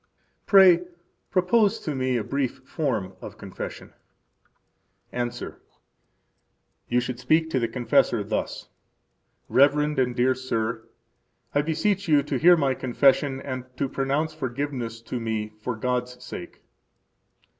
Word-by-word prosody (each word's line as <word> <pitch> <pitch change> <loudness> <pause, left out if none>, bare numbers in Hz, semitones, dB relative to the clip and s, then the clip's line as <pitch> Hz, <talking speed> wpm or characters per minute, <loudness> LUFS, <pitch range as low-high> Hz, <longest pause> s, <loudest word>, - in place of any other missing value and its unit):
Pray, 190 -4 +8 0.5
Propose 195 +3 +3
to 155 - -4
Me 130 -2 0
a 115 - -1
Brief 135 -1 -3
Form 110 - -2
of - - -9
Confession. - - -8 1.2
–Answer: 120 0 -4 1.3
You 120 - +3
should 125 0 -4
speak 160 +5 +2
to 130 - +1
the 115 - 0
confessor 125 -1 +2
thus: - - -3 0.8
Reverend 145 +1 +3
and 125 -1 +1
dear 125 +2 +3
sir, 115 -3 -3 0.6
I 145 - +3
beseech 185 +6 0
you 145 -3 +4
to 145 - -2
hear 175 +1 +7
my 140 -4 +2
confession, 135 +2 +2
and 130 -2 -5
to 140 - 0
pronounce 140 +4 -1
forgiveness 130 -5 -4
to 125 +2 -4
me 110 -2 -2
for 125 +1 -3
God's 125 +1 -2
sake. 90 - -9
130 Hz, 125 wpm, -25 LUFS, 120-150 Hz, 1.3 s, Pray